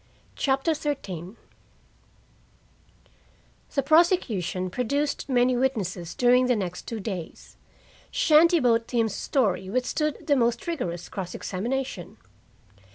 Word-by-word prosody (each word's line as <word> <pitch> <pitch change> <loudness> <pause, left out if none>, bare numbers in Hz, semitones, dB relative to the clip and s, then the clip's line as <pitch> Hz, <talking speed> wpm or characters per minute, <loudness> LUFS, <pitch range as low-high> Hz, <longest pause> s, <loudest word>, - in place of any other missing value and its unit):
CHAPTER 270 +4 +1
XIII 200 - -4 2.4
The 275 - +2
prosecution 260 - +2
produced 280 +6 -1
many 250 0 +3
witnesses 200 -10 -2
during 250 +1 +4
the 250 - +3
next 180 -4 -4
two 230 - -4
days: 190 -5 -7 0.5
Shanty 330 +2 +5
boat 230 -3 +2
Tim's 225 -4 0
story 195 -9 0
withstood 255 +6 -1
the 290 - +3
most 235 -2 +1
vigorous 180 - -3
cross 185 -3 -6
examination. 230 -1 -4
245 Hz, 100 wpm, -26 LUFS, 190-280 Hz, 2.4 s, Shanty